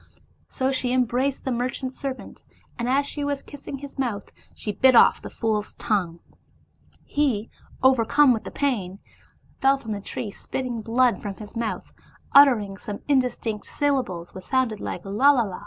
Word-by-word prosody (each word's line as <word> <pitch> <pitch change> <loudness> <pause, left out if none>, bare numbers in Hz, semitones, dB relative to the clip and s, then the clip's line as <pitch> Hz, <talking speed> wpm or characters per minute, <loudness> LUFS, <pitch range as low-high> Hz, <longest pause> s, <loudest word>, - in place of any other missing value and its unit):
So 265 0 -1
she 255 -2 0
embraced 255 +2 0
the 260 - -1
mer 245 +1 0
chant's 260 +1 -5
servant, 270 -2 -6 0.4
and 240 +1 -1
as 275 +2 +2
she 290 +1 -4
was 285 -1 -2
kissing 280 -1 -8
his 280 0 -10
mouth, 230 -6 -2 0.2
she 210 - -3
bit 255 +5 +4
off - - +6
the - - -7
fool's 215 -2 -2
tongue. 180 -6 -1 0.8
He, 255 -8 0 0.3
overcome 260 +2 +5
with 225 - -3
the - - -6
pain, 205 -10 -2 0.6
fell 270 +1 +4
from 225 -5 -7
that 200 -1 -4
tree 210 - -4
spitting 245 +2 -4
blood 235 +2 +2
from 200 -2 -5
his 210 +2 -11
mouth, 230 -1 -4 0.4
uttering 230 -9 +6
some 205 0 -6
indis 260 -3 +2
tinct 215 -3 -4
syllables, 255 -13 -1
which 185 - -9
sounded 255 -5 0
like - - -5
Lalalla. 225 -1 +3
245 Hz, 165 wpm, -24 LUFS, 210-270 Hz, 0.8 s, off